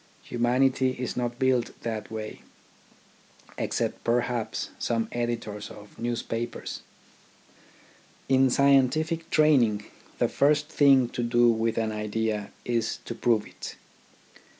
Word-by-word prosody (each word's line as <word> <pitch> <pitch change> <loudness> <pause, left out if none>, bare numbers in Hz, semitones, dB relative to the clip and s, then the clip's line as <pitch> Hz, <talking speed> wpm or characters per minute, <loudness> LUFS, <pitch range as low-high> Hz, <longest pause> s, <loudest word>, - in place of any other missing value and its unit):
Humanity 130 +2 +2
is 125 -1 -3
not 120 -1 -2
built 130 -2 +1
that 110 -2 -4
way 110 -1 -6 0.6
— - - -27
except - - -2
perhaps 120 -1 -1
some 115 -1 0
editors 120 -3 -3
of 105 0 -13
newspapers. 120 0 -3 1.5
In 135 0 +4
scientific 140 +5 +3
training, 125 -11 +4 0.3
the - - +2
first 150 +1 +2
thing 135 -3 +5
to 120 - -4
do 120 0 +4
with 115 0 0
an 110 -1 0
idea 105 0 -2 0.2
is 115 -2 0
to - - -4
prove 115 -2 +1
it. - - -9
120 Hz, 115 wpm, -27 LUFS, 110-130 Hz, 1.5 s, thing